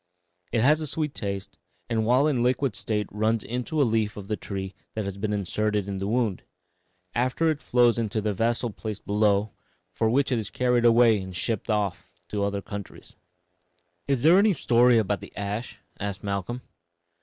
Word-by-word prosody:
It 115 - +1
has 150 +6 +4
a 155 - -2
sweet 150 0 -2
taste, 100 -2 -5 0.3
and 110 -2 0
while 130 +4 +4
in 145 -5 +1
a - - +1
liquid 125 -1 +1
state 105 +1 -1
runs 110 +1 0
into 125 +6 -3
a 140 - +5
leaf 110 -2 0
of 100 0 -8
the 105 - +1
tree 95 -2 -5 0.2
that 110 -2 -2
has 100 -1 -4
been 105 +2 -2
inserted 105 +1 -1
in 100 -1 -3
the 95 - -2
wound. 110 -4 0 0.7
Afterward 140 +6 +1
it - - -23
flows 120 -1 +3
into 110 -1 -2
a 105 - +1
vessel 115 +3 0
placed 105 0 -6
below, 105 0 +2 0.4
from 110 0 0
which 135 +2 +2
it 120 - +2
is 105 -2 -4
carried 125 -1 +1
away 115 -3 +5
and 95 -1 -8
shipped 110 +5 -2
off 100 - -1 0.2
to 105 -1 -1
other 100 -1 -1
countries." 100 -1 -9 0.9
"Is 135 -4 +1
there 170 +5 +7
any 205 0 +4
story 120 -5 +4
about 105 -2 0
the - - -12
ash?" 105 +4 -4 0.2
asked 100 -1 -4
Malcolm. 100 +5 -3
110 Hz, 190 wpm, -26 LUFS, 100-125 Hz, 0.9 s, there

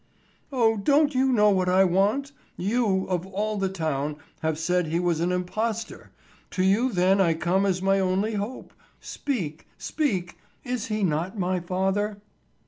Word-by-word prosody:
"O 225 -4 +2
don't 290 +8 +3
you 265 +1 +2
know 210 -4 +4
what 185 -2 +1
I 185 +1 +5
want? 200 +10 +1 0.3
You, 200 -1 +1
of 180 -1 -2
all 210 +2 -2
the 195 -1 0
town, 155 -5 -2 0.2
have 160 -1 -1
said 180 +1 0
he 165 +2 0
was 175 -2 0
an 175 +2 0
impostor! 215 +5 -3 0.4
To 185 - -1
you 215 +7 +3
then 190 0 +3
I 165 -3 +3
come 185 +4 +1
as 185 -2 +1
to - - -4
my 195 0 +3
only 190 +4 0
hope; 210 +5 -5 0.3
speak, 175 - -4
speak, 190 - -2 0.2
is 245 -3 -3
he 215 -1 -1
not 175 +4 -1
my 185 -1 0
father?" 195 +4 -1
190 Hz, 165 wpm, -25 LUFS, 180-215 Hz, 0.4 s, I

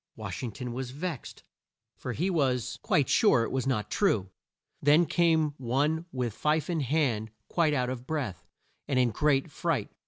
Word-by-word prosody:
Wash - - -6
ing 120 - -3
ton 125 +3 -6
was 130 0 -4
vexed, 150 +1 -6 0.5
for 125 - -5
he 180 +10 0
was 125 -7 0
quite 145 -3 +2
sure 205 - +4
it - - -3
was 130 0 -1
not 110 -6 -1
true. 105 - +1 0.5
Then 150 +4 +5
up 160 - -5
came 160 -3 +3
one 145 +7 0
with 125 -4 -2
fife 150 +6 0
in 165 - 0
hand, 130 -6 0 0.2
quite 160 -4 +2
out 125 -1 0
of 125 0 -7
breath, 130 - -3 0.4
and 140 -3 0
in 125 -2 +3
great 140 +3 +1
fright. - - -1
135 Hz, 180 wpm, -29 LUFS, 125-155 Hz, 0.5 s, Then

